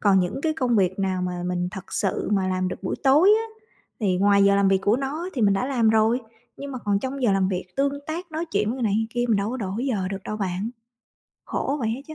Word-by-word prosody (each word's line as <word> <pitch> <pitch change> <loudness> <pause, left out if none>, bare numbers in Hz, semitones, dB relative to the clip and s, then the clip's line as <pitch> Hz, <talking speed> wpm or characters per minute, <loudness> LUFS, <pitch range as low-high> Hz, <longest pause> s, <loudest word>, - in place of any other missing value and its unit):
Còn 195 -2 +4
những 180 +8 -2
cái 320 - +1
công 250 -6 +1
việc 190 -1 +1
nào 190 -2 -1
mà 180 -1 -3
mình 180 0 -1
thật 190 -2 -9
sự 195 - -1
mà 190 -2 +1
làm 185 0 0
được 185 - -7
buổi 185 - -2
tối 295 +9 +6
á, 450 - -3 0.5
thì 190 -4 +1
ngoài 200 0 +4
giờ 200 0 +5
làm 200 -1 +3
việc 195 0 +4
của 210 +4 +3
nó 285 +7 -3
thì 250 - -1
mình 200 -1 +4
đã 225 +6 0
làm 245 -5 +2
rồi 220 +3 +3 0.4
nhưng 280 0 -7
mà 255 - -4
còn 205 -1 +2
trong 265 +2 -4
giờ 230 -5 +3
làm 190 -1 +2
việc, 185 -1 -2
tương 275 0 +2
tác 335 +1 -5
nói 320 +2 -2
chuyện 315 -9 0
với 230 - -1
người 260 - -5
này, 205 -3 +1
người 225 0 0
kia 240 +1 -1
mình 220 - +3
đâu 200 +2 -1
có 255 - -3
đổi 215 +2 -3
giờ 200 -8 -1
được 195 -1 -5
đâu 215 - -4
bạn. 195 +2 -2 0.8
Khổ 280 - -1
vậy 225 - 0
ấy 270 - -9
chứ. 310 - -7
210 Hz, 275 wpm, -24 LUFS, 190-265 Hz, 0.8 s, tối